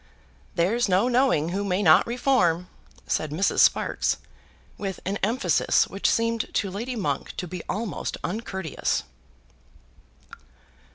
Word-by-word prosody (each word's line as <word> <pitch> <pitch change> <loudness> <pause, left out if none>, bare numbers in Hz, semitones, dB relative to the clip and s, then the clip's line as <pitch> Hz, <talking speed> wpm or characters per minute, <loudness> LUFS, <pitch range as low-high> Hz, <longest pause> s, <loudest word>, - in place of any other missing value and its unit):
"There's 200 +7 +1
no 190 +6 +3
knowing 250 - +2
who 195 +3 -2
may 195 0 0
not 160 0 +6
reform," 235 -9 +1 0.4
said 155 - -1
Mrs. 170 +7 0
Sparkes, - - +3 0.6
with 195 -2 -5
an 195 +2 -1
emphasis 235 +7 +2
which 195 - 0
seemed 230 0 0
to 195 - 0
Lady 235 +6 -4
Monk 210 - -3
to 180 - -4
be 180 0 -6
almost 210 -1 -3
uncourteous. 190 -4 -2
200 Hz, 120 wpm, -25 LUFS, 180-230 Hz, 0.6 s, not